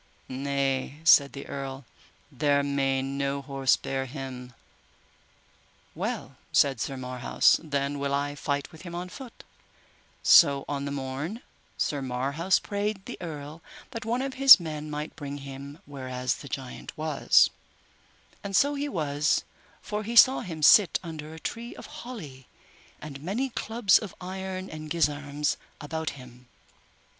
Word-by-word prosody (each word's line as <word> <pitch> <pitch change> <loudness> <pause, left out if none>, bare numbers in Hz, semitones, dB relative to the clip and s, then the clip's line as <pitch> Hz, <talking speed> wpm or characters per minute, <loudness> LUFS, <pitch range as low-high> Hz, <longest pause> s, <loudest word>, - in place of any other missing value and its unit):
Nay, 135 +1 -1
said 140 -3 +6
the 140 - -7
earl, 135 -1 -6 0.5
there 145 -1 +2
may 135 -1 0
no 140 +1 -2
horse 135 -1 +2
bear 135 0 -3
him. 125 -2 -7 1.4
Well, - - -4
said 135 -5 +3
Sir 135 - -3
Marhaus, 125 -1 +2
then 140 -2 -2
will 140 0 -1
I 145 +1 0
fight 145 +1 -3
with 160 - -13
him 175 -2 -8
on 180 +1 -5
foot; 255 +2 -11 0.8
so 140 -1 +7
on 140 -1 -3
the 140 - -3
morn 140 - -4 0.3
Sir 145 -2 -1
Marhaus 140 +8 +1
prayed 205 -1 -3
the - - -6
earl 155 -1 -7 0.3
that 230 -3 -5
one 240 +3 -1
of 270 -1 -3
his 270 -5 +11
men 155 -2 -5
might 150 +1 -5
bring 145 -1 -6
him 140 +1 -9
whereas 130 -3 -3
the 140 - -10
giant 130 +4 -7
was; 155 -1 +4 0.9
and 195 -1 -3
so 285 +6 +4
he 290 0 -2
was, 150 - +1 0.4
for 210 0 -3
he 230 +3 -5
saw 260 +3 +8
him 160 -4 -6
sit 190 +3 +7
under 155 -2 -7
a 160 - -9
tree 235 +6 -5
of - - -10 0.2
holly, 150 - -9 0.5
and 140 -2 -8
many 230 - -2
clubs 220 -4 +3
of 210 -4 -8
iron 190 0 -5
and 155 -2 -8
gisarms 145 -2 0 0.2
about 160 +1 -3
him. 125 -1 -14
145 Hz, 145 wpm, -27 LUFS, 140-180 Hz, 1.4 s, his